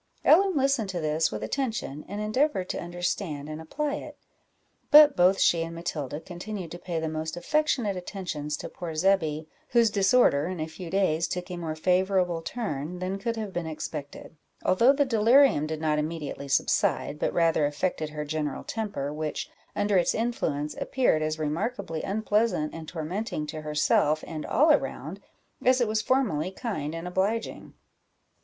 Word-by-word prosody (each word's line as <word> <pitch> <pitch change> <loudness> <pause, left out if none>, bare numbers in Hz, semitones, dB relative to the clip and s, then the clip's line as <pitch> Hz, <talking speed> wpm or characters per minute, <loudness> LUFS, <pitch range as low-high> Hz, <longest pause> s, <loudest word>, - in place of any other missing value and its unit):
Ellen 380 +3 +5
listened 270 -6 +1
to 180 -2 -3
this 155 0 +1
with 105 0 -4
attention, 220 - -3
and 205 +2 -5
endeavoured 215 -2 0
to - - -3
understand 175 -3 -3
and 155 +1 -6
apply 290 - -2
it; - - -9 0.7
but 300 -1 +9
both 185 +2 +4
she 170 - +4
and 165 0 -4
Matilda 150 -4 -4
continued 180 +1 -7
to 175 - -7
pay 175 -2 -3
the 160 - -2
most 160 +1 -4
affectionate 240 - +1
attentions 175 -5 -4
to - - -6
poor 165 -3 -7
Zebby, 160 -3 +1 0.2
whose 235 -2 +4
disorder 195 - +4
in 185 -2 -4
a 155 - -1
few 165 +2 -8
days 170 -3 +1
took 180 +2 -4
a - - -3
more 165 -3 -4
favourable 180 0 +1
turn 170 - -4
than 185 +2 -3
could 230 +3 -2
have 215 -4 -5
been 175 -2 -3
expected, 150 -1 -7 0.3
although 230 +8 +5
the 285 +1 +2
delirium 235 - +4
did 155 0 -4
not 155 -1 +1
immediately 150 -2 -4
subside, 140 +1 +1
but - - 0
rather 165 -3 +3
affected 155 +1 -2
her 150 0 -5
general 150 -2 -3
temper, 200 -11 -3
which, 155 0 -4 0.2
under 205 -1 +2
its 175 - +1
influence, 160 - -1
appeared 250 -12 +2
as 155 0 -1
remarkably 160 +2 -2
unpleasant 210 -5 0
and 160 -1 -8
tormenting 170 +1 -3
to 155 +1 -6
herself 150 0 +2
and 155 -2 -6
all 305 +2 +4
around, 295 - -1 0.4
as 255 +1 +4
it 240 - +2
was 215 0 0
formerly 205 - +1
kind 185 - -4
and 165 +2 -5
obliging. 195 +5 -2
175 Hz, 165 wpm, -27 LUFS, 155-215 Hz, 0.7 s, but